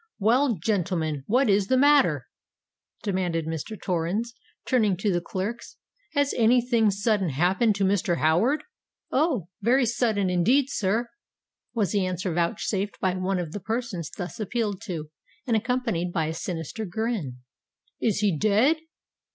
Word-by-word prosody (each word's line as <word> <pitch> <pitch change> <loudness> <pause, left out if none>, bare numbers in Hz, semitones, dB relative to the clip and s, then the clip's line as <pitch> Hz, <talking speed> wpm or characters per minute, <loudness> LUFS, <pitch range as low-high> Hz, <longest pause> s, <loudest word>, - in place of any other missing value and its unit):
"Well, 240 +4 +3
gentlemen, 165 -6 -1
what 255 +4 +3
is 200 -1 +3
the 260 - +3
matter?" 290 +2 +4 0.8
demanded 180 -5 -1
Mr. 160 +6 -5
Torrens, 185 +8 -1 0.3
turning 215 -7 +2
to 195 +1 0
the 175 - 0
clerks. 200 +7 -5 0.4
"Has 285 -2 +1
any 240 +1 +5
thing 235 -3 +2
sudden 200 -2 +1
happened 185 - +2
to 200 - 0
Mr. 190 -2 +1
Howard?" 225 - +2 0.5
"Oh! 260 - +1
very 250 +5 +3
sudden 220 -4 +1
indeed, 245 +11 +2
sir," 220 +3 0 0.6
was 205 -7 +1
the 200 -2 +1
answer 185 -1 -2
vouchsafed 195 +3 -1
by 185 -2 +1
one 185 +1 -1
of 175 -4 -3
the 205 - -5
persons 220 -5 -3
thus 180 +4 -7
appealed 210 -2 -2
to, 160 -6 -5 0.3
and 235 -4 +1
accompanied 220 -7 -1
by 160 -2 0
a 160 - -2
sinister 165 +5 -4
grin. 205 - -3 0.6
"Is 215 -2 +1
he 200 -5 +2
dead?" 215 - +3
200 Hz, 145 wpm, -26 LUFS, 175-235 Hz, 0.8 s, any